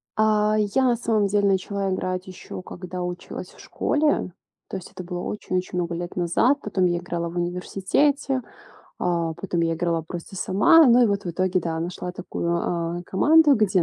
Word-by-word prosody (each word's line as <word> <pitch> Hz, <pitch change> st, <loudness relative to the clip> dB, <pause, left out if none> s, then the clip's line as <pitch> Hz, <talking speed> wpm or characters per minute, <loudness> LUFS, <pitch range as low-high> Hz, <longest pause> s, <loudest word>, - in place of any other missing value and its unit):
А, 215 Hz, 0 st, +3 dB
я, 210 Hz, +5 st, +1 dB
на 245 Hz, -2 st, +3 dB
самом 220 Hz, -3 st, +1 dB
деле 205 Hz, 0 st, +2 dB
начала 195 Hz, 0 st, 0 dB
играть 185 Hz, 0 st, -3 dB
ещё 185 Hz, 0 st, -8 dB
когда 180 Hz, 0 st, -7 dB
училась 180 Hz, 0 st, -6 dB
в -, -, -20 dB
школе. 295 Hz, -10 st, 0 dB, 0.4 s
То 195 Hz, -, -4 dB
есть 185 Hz, -, -10 dB
это 185 Hz, -, -8 dB
было 175 Hz, 0 st, -5 dB
очень-очень 185 Hz, -3 st, -3 dB
много 170 Hz, -1 st, -1 dB
лет 175 Hz, +1 st, -5 dB
назад. 180 Hz, +10 st, +2 dB
Потом 195 Hz, -3 st, 0 dB
я 175 Hz, -1 st, +2 dB
играла 170 Hz, -1 st, -3 dB
в 170 Hz, -, -10 dB
университете, 200 Hz, +10 st, 0 dB, 0.6 s
а, 170 Hz, -2 st, 0 dB
потом 175 Hz, 0 st, -3 dB
я 165 Hz, 0 st, +1 dB
играла 165 Hz, -1 st, -1 dB
просто 175 Hz, +3 st, -8 dB
сама. 320 Hz, -, +5 dB
Ну 245 Hz, 0 st, +6 dB
и -, -, +5 dB
вот 200 Hz, -1 st, -1 dB
в 175 Hz, -, -2 dB
итоге 185 Hz, +1 st, 0 dB
да, 160 Hz, -1 st, -3 dB
нашла 180 Hz, +1 st, -4 dB
такую, 170 Hz, -1 st, -2 dB
э, -, -, -9 dB
команду, 295 Hz, -, +5 dB
где 195 Hz, -5 st, +2 dB
185 Hz, 180 wpm, -24 LUFS, 175-210 Hz, 0.6 s, Ну